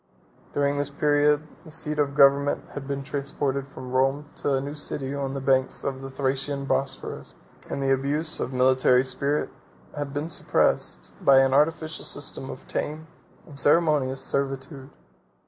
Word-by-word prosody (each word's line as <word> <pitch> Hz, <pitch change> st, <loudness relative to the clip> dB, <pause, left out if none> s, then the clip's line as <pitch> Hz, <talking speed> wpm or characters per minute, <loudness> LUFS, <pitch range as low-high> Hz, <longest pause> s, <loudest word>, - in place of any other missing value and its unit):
During 145 Hz, 0 st, +1 dB
this 145 Hz, 0 st, -1 dB
period, 145 Hz, +1 st, +2 dB, 0.2 s
the 165 Hz, -, -13 dB
seat 150 Hz, -1 st, -3 dB
of 140 Hz, -1 st, +1 dB
government 140 Hz, +1 st, +5 dB
had 135 Hz, -1 st, -6 dB
been 140 Hz, -1 st, -3 dB
transported 140 Hz, -1 st, -2 dB
from 130 Hz, -2 st, -9 dB
Rome 135 Hz, +3 st, +1 dB
to 140 Hz, -, +1 dB
a -, -, +1 dB
new 140 Hz, +2 st, -5 dB
city 140 Hz, -2 st, -3 dB
on 140 Hz, -1 st, -3 dB
the -, -, -2 dB
banks 130 Hz, 0 st, +1 dB
of 135 Hz, -1 st, -3 dB
the 135 Hz, -, -6 dB
Thracian 135 Hz, +1 st, -1 dB
Bosphorus; 135 Hz, 0 st, -2 dB, 0.3 s
and 140 Hz, -, -2 dB
the 135 Hz, 0 st, +3 dB
abuse 145 Hz, +4 st, 0 dB
of -, -, -2 dB
military 130 Hz, 0 st, +4 dB
spirit 140 Hz, +3 st, -1 dB, 0.4 s
had 145 Hz, -1 st, -4 dB
been 145 Hz, +3 st, -3 dB
suppressed -, -, +1 dB
by 135 Hz, -1 st, +7 dB
an 135 Hz, 0 st, +2 dB
artificial 155 Hz, +2 st, +1 dB
system 135 Hz, -2 st, -2 dB
of -, -, -9 dB
tame 155 Hz, +2 st, -4 dB, 0.4 s
and 145 Hz, -3 st, -10 dB
ceremonious 145 Hz, -4 st, +3 dB
servitude. 135 Hz, 0 st, -3 dB
140 Hz, 160 wpm, -25 LUFS, 135-145 Hz, 0.4 s, by